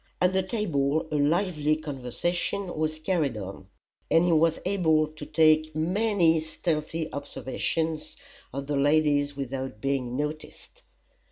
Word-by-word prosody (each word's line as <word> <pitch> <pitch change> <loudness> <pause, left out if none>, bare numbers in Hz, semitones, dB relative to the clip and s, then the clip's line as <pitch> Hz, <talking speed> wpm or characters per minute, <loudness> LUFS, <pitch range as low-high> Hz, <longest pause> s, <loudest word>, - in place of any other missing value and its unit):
At 180 +1 +3
the 190 - +3
table 160 -8 0
a - - -1
lively 155 0 +2
conversation 155 +6 -3
was 155 0 -1
carried 155 - 0
on, 95 -1 -7 0.4
and 165 +1 +4
he 175 - +3
was 165 0 +3
able 165 -5 +3
to 155 -1 -9
take 155 -1 +3
many 175 0 +2
stealthy 160 0 -2
observations 155 +3 -3 0.3
of 140 +1 -4
the 145 0 -1
ladies 145 0 +2
without 130 -4 -4
being 130 -1 -1
noticed. 150 +1 -6
155 Hz, 125 wpm, -27 LUFS, 145-165 Hz, 0.4 s, and